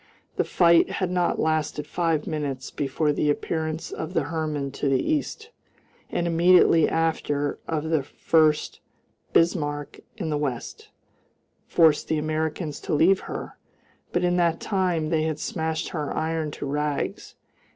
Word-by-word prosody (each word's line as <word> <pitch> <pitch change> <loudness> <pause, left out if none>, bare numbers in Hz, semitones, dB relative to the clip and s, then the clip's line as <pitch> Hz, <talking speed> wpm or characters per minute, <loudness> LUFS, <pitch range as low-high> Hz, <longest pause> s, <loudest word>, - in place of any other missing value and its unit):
The - - +2
fight 170 -1 +4
had 185 -2 -1
not 180 -1 +1
lasted 155 -2 0
five 165 -3 0
minutes 145 -5 -4
before 150 +2 0
the 150 - 0
appearance 160 +2 -2
of 160 +4 -6
the 160 - +2
Hermann 150 -2 -3
to 140 +1 -1
the 135 -1 +3
east, 315 +9 -2 0.6
and 175 - -1
immediately 170 -1 +5
after 150 -3 -1
of 160 0 -2
the 160 -3 +3
Furst 155 +2 +1 0.5
Bismarck 145 -4 +1 0.2
in 165 -7 -3
the 150 - 0
west, 135 -5 -4 0.8
forced 160 -3 +4
the 160 - 0
Americans 155 0 -2
to - - -2
leave 185 +6 +4
her, - - -7 0.5
but 175 - 0
in 180 0 +2
that 170 -2 +2
time 180 -6 0
they 160 -1 +1
had 155 -1 -1
smashed 160 +1 -3
her 150 -5 -3
iron 160 -1 -1
to 145 - -6
rags. 145 +1 -3
160 Hz, 145 wpm, -25 LUFS, 150-170 Hz, 0.8 s, immediately